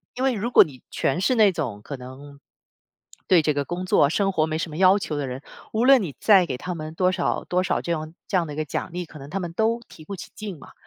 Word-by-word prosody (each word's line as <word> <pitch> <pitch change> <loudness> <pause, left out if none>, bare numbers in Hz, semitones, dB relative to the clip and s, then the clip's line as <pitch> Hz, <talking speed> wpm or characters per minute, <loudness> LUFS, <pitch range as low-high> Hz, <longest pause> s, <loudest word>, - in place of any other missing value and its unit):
因 255 - -3
为 265 - +3
如 230 +3 -3
果 - - +8
你 135 -5 -13
全 170 +7 0
是 255 - +2
那 210 -3 +5
种 120 -11 -4
可 140 - -7
能， 135 +3 -11 0.9
对 180 -4 +6
这 150 0 +1
个 145 0 -1
工 175 +4 -4
作 145 -5 +4
生 195 +3 +1
活 155 -3 +2
没 160 0 -2
什 165 - -3
么 150 - -8
要 190 +2 +5
求 155 - -4
的 145 - -2
人， 130 +2 -6 0.3
无 225 +3 +1
论 265 -4 +6
你 150 -7 -5
再 195 -5 +5
给 130 -4 -4
他 180 +4 -5
们 155 0 -6
多 185 +1 +2
少 175 - -1
多 180 +1 0
少 - - 0
这 170 - -4
样 155 0 -5
这 - - -2
样 170 - +1
的 150 - -7
一 - - -7
个 155 - -1
奖 140 - -4
励， 180 0 -4
可 155 - -13
能 140 +1 -10
他 195 +5 -3
们 175 -2 -5
都 225 +5 +1
提 155 - -14
不 195 +5 -7
起 - - -9
劲 200 -8 -7
嘛。 - - -14
170 Hz, 305 characters per minute, -24 LUFS, 145-195 Hz, 0.9 s, 果